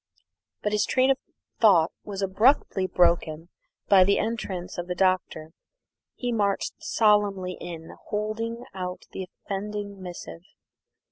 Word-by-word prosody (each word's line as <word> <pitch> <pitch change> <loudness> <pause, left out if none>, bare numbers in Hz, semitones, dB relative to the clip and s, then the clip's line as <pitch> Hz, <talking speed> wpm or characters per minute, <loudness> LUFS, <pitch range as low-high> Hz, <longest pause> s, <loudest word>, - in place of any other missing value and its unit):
But 210 - 0
his 210 -1 +1
train 260 +1 +3
of 270 - +1 0.4
thought 180 -7 +5
was 200 -1 -5
abruptly 195 -1 +3
broken 170 -2 +2 0.4
by 195 -2 +7
the 200 +2 +3
entrance 190 -7 -3
of 175 - -4
the 180 - -2
Doctor. 180 -4 0 0.6
He 245 -1 -2
marched 205 -4 0
solemnly 205 -4 +2
in, 165 -2 -7
holding 225 +3 -3
out 180 -1 -5
the 190 - -5
offending 200 0 -5
missive. 175 -2 -8
195 Hz, 125 wpm, -26 LUFS, 180-210 Hz, 0.6 s, by